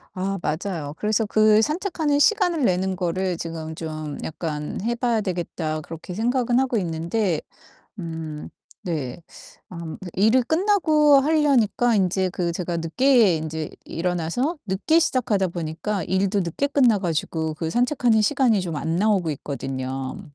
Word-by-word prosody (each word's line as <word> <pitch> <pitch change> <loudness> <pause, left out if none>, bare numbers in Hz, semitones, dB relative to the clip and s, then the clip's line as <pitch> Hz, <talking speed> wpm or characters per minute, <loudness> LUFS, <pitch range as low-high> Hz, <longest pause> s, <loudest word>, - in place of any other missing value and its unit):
아 195 +1 -2
맞아요. 155 -2 -3
그래서 215 +1 +1
그 215 0 +4
'산책하는 310 - 0
시간을 355 - +3
내는 185 +1 +1
거를 180 0 -1
지금 160 -1 -6
좀 155 -2 -5
약간 150 -2 -4
해 235 +1 0
봐야 235 -2 0
되겠다.' 170 -4 -3
그렇게 165 +3 -8
생각은 245 +3 +1
하고 255 -3 +1
있는데 170 0 -1 0.6
음 160 -3 -6 0.3
네. 155 -4 -4 0.5
아 170 -3 -7 0.2
일을 220 +7 +4
끝나고 315 - +4
하려니까 270 -6 +2
인제 190 -1 +1
그 175 -2 -2
제가 170 0 -3
늦게 210 +3 +3
인제 155 0 -4 0.2
일어나서 180 - -1
늦게 200 - +1
시작하다 215 - +1
보니까 170 +4 -3
일도 195 +3 +1
늦게 180 - -1
끝나 255 -6 +4
가지고 160 -3 -2
그 160 0 -3
산책하는 245 -3 +2
시간이 235 -4 +2
좀 170 -3 -4
안 165 +2 -2
나오고 195 -4 +2
있거든요. 135 +2 -5
190 Hz, 300 characters per minute, -23 LUFS, 165-240 Hz, 0.6 s, 그